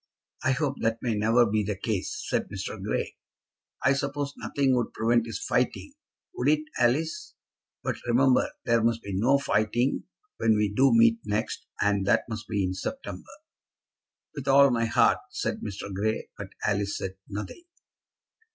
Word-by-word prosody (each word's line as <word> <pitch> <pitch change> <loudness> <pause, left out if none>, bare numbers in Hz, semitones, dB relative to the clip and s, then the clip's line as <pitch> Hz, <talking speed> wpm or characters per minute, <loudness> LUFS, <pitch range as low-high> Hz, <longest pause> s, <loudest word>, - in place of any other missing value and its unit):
"I 130 - +3
hope 135 0 -1
that 115 0 +1
may 120 -3 +1
never 115 +3 +4
be 110 -1 +1
the 105 0 -2
case," 120 - -3
said - - -1
Mr. - - -5
Grey. - - -2 0.7
"I 130 - +5
suppose 140 +1 -2
nothing 135 -2 +1
would 120 -2 -1
prevent 115 +1 +2
his 115 - -4
fighting; - - -1 0.4
would 125 - -2
it 155 0 +3 0.2
Alice? 160 - 0 0.5
But, - - -2
remember, 125 +2 +4 0.2
there 115 -2 +3
must 115 0 +1
be 100 - -5
no 120 +9 +3
fighting 120 -1 0 0.3
when 110 -1 +3
we 105 -1 +1
do 135 +4 +4
meet 115 0 +5
next, 105 +1 -3
and 100 -1 +2
that - - +4
must 110 -2 -6
be 105 -3 0
in 90 0 -1
September." 270 - -6 1.0
"With 140 -3 -7
all 140 0 +6
my 115 -1 +1
heart," 115 0 +3
said - - -3
Mr. 100 -1 -6
Grey. 110 +3 -1
But - - -7 0.2
Alice 100 -1 0
said 95 0 -5
nothing. 105 - -6
115 Hz, 160 wpm, -27 LUFS, 105-135 Hz, 1.0 s, all